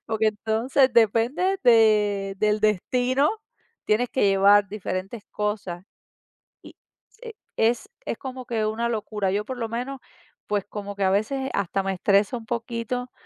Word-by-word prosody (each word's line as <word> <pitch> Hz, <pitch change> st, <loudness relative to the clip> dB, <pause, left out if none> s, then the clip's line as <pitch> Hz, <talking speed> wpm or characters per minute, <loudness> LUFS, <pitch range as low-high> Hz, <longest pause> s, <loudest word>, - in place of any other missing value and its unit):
Porque, 220 Hz, 0 st, 0 dB
entonces, 225 Hz, +5 st, +1 dB
depende 240 Hz, -, +2 dB
de 210 Hz, -4 st, +4 dB
del 210 Hz, 0 st, +1 dB
destino, 250 Hz, +7 st, +2 dB, 0.5 s
tienes 230 Hz, +3 st, +1 dB
que 260 Hz, -, 0 dB
llevar 200 Hz, +1 st, +5 dB
diferentes 200 Hz, +1 st, -5 dB
cosas. 205 Hz, -4 st, -3 dB, 0.8 s
Y -, -, -13 dB, 0.3 s
se 455 Hz, -1 st, -11 dB, 0.2 s
es 240 Hz, -, +1 dB, 0.2 s
es -, -, -3 dB
como 260 Hz, -1 st, -7 dB
que 225 Hz, -3 st, -1 dB
una 230 Hz, +2 st, -1 dB
locura. 210 Hz, -3 st, -2 dB
Yo, 205 Hz, +2 st, -1 dB
por 260 Hz, -1 st, -6 dB
lo 230 Hz, -2 st, -3 dB
menos, 250 Hz, +4 st, -4 dB, 0.5 s
pues, 205 Hz, -1 st, -1 dB
como 205 Hz, -1 st, -6 dB
que 200 Hz, -, -2 dB
a 190 Hz, -, +3 dB
veces 265 Hz, +7 st, -1 dB
hasta 195 Hz, 0 st, -1 dB
me 195 Hz, 0 st, -1 dB
estresa 200 Hz, +5 st, +2 dB
un 225 Hz, -, -10 dB
poquito, 240 Hz, +1 st, -4 dB
220 Hz, 150 wpm, -24 LUFS, 205-245 Hz, 0.8 s, llevar